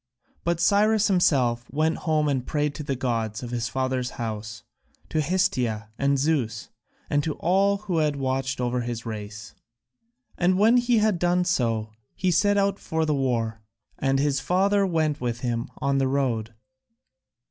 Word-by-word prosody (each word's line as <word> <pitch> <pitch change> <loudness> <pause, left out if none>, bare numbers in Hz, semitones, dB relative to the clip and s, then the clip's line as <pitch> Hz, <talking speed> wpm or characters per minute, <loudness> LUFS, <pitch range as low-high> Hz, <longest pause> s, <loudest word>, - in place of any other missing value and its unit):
But 170 -1 0
Cyrus 210 +3 +3
himself 125 -10 +2
went 155 +3 0
home 155 -1 +2
and 135 -3 0
prayed 150 +1 -1
to - - -6
the 140 -2 -2
gods 115 -3 -2
of 120 - -6
his 120 -2 -2
father's 130 -1 -1
house, 110 -1 -5 0.5
to 155 - 0
Hestia 130 - 0
and 140 0 +2
Zeus, 135 -6 -1 0.4
and 145 0 +1
to 155 -1 -2
all 195 +3 +2
who 195 -5 -2
had 150 -2 +1
watched 135 -1 -2
over 125 0 0
his 120 -1 -5
race. 105 -2 -7 0.9
And 185 +1 +3
when 225 +5 +5
he 245 -1 +3
had 215 -4 +2
done 180 +1 +2
so, 115 -10 0 0.2
he 185 -1 0
set 205 +4 +3
out 200 0 +1
for 160 0 -1
the 155 - +1
war, 115 -5 -1 0.4
and 135 0 +1
his 140 0 +1
father 195 +4 +2
went 155 -5 0
with 120 -1 -2
him 120 -2 -2
on 140 0 0
the 135 - +2
road. 120 -5 -1
140 Hz, 165 wpm, -25 LUFS, 120-175 Hz, 0.9 s, when